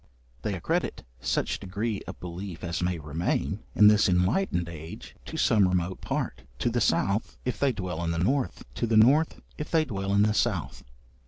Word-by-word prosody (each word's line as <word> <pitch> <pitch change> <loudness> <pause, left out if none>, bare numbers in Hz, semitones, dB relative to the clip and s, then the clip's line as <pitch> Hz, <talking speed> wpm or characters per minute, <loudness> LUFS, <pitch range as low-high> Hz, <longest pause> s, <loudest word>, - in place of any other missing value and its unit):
They - - -2
accredit - - -1 0.2
such - - -1
degree 100 +3 -3
of - - -7
belief 90 0 -7
as 85 -1 -2
may 90 0 0
remain, 75 +2 -1 0.2
in 105 - +7
this 105 -1 +5
enlightened 90 - +1
age, 80 -1 -9
to - - -6
some 100 -3 +4
remote 90 0 -1
part - - -3 0.2
to 120 - 0
the 120 0 0
south, 100 +1 +1
if 125 - -2
they 140 -1 +3
dwell 90 -6 -4
in 85 - -1
the 85 - -1
north; 125 +10 0
to 120 - -1
the 110 -1 +3
north, 140 +9 +4 0.2
if 150 - -4
they 160 -2 +3
dwell 100 -6 -3
in 100 - +5
the 105 0 +3
south. 105 -7 -1
100 Hz, 185 wpm, -27 LUFS, 85-115 Hz, 0.2 s, in